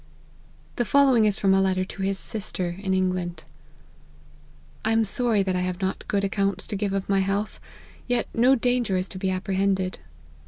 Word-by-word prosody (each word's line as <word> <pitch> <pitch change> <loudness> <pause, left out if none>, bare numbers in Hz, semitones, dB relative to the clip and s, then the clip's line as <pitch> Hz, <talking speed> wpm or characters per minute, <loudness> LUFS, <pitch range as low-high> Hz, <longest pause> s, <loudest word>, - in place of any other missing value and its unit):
The 240 - +2
following 260 -3 +4
is 205 -2 +2
from 195 -1 +3
a 195 - +4
letter 185 -1 +1
to 195 - -8
his 195 0 0
sister, 190 -5 -3
in 190 -2 -1
England: 180 -3 -1 0.7
" 75 0 -28
I 220 - +1
am 225 0 +3
sorry 220 0 +1
that 190 -1 -1
I - - 0
have 180 0 -2
not 190 0 -3
good 200 -1 0
accounts 200 0 0
to 210 - -4
give 200 0 -1
of 195 -1 -2
my 195 -1 +2
health; 195 +2 -1 0.5
yet 245 -1 +1
no 250 +4 +5
danger 245 -5 +1
is 185 +1 -1
to 185 - -7
be 190 - -1
appre 185 +1 -2
hended. 190 -1 0
195 Hz, 195 wpm, -25 LUFS, 185-215 Hz, 0.7 s, no